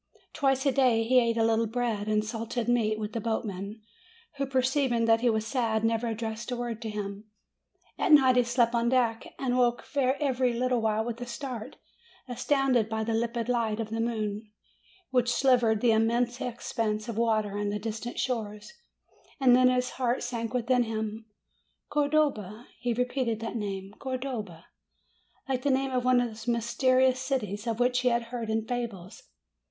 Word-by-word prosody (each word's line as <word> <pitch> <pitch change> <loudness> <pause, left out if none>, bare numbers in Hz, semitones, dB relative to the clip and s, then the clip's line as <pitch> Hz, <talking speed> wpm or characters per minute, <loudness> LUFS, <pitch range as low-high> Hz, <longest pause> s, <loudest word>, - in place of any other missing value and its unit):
Twice 270 -2 +1
a 275 - +4
day 250 -4 +3
he 255 +3 +4
ate 230 -1 +1
a 225 - +3
little 225 0 +2
bread 225 -3 -2
and 215 0 +1
salted 230 +1 -3
meat 225 -3 +2
with 215 0 -5
the 230 - -2
boatmen, 210 -1 -4 0.5
who, 275 0 -1
perceiving 260 -2 +1
that 225 0 +4
he 245 - +3
was 220 -1 0
sad, 225 -3 0
never 225 +1 +1
addressed 225 0 -4
a 250 - -2
word 235 -2 -4
to 225 - -4
him. 205 0 -6 0.7
At - - +1
night 265 -4 +7
he 250 - +6
slept 240 0 +1
on 235 0 +2
deck 235 -3 +1
and 255 -2 -1
woke 240 -1 +2
every 260 -2 +1
little 250 0 0
while 220 0 0
with 235 0 -5
a 245 - -5
start, 240 -2 -6 0.5
astounded 255 -2 +1
by 220 0 -1
the 225 +1 -1
limpid 230 0 -1
light 230 -3 0
of 220 -1 -4
the 225 - -2
moon, 215 -2 -3 0.6
which 245 -2 +2
silvered 240 -4 +3
the 240 - +4
immense 235 +2 +1
expanse 225 -3 -2
'of 230 - -4
water 215 -3 +1
and 205 0 -1
the 205 - -1
distant 225 +3 -5
shores; 225 - -3 0.7
and 255 -3 +6
then 255 0 +5
his 250 0 0
heart 250 -1 -1
sank 235 -2 -3
within 250 0 +2
him. 220 -1 -3 0.6
"Cor 295 -1 +1
dova!" 240 -8 0
He 240 +1 -1
repeated 245 -1 -1
that 225 +1 -4
name, 195 -2 -4
"Cordova!" 250 -10 -5 0.8
like 260 -2 -1
the 285 - 0
name 265 0 +1
of 250 -1 0
one 255 0 +4
of 245 -1 0
those 220 +1 -11
mysterious 255 +2 +2
cities 245 -5 -3
of 230 0 -1
which 250 0 +2
he 250 - 0
had 235 -1 +2
heard 230 -3 -3
in 220 0 0
fables. 230 -7 -5
235 Hz, 180 wpm, -28 LUFS, 220-250 Hz, 0.8 s, night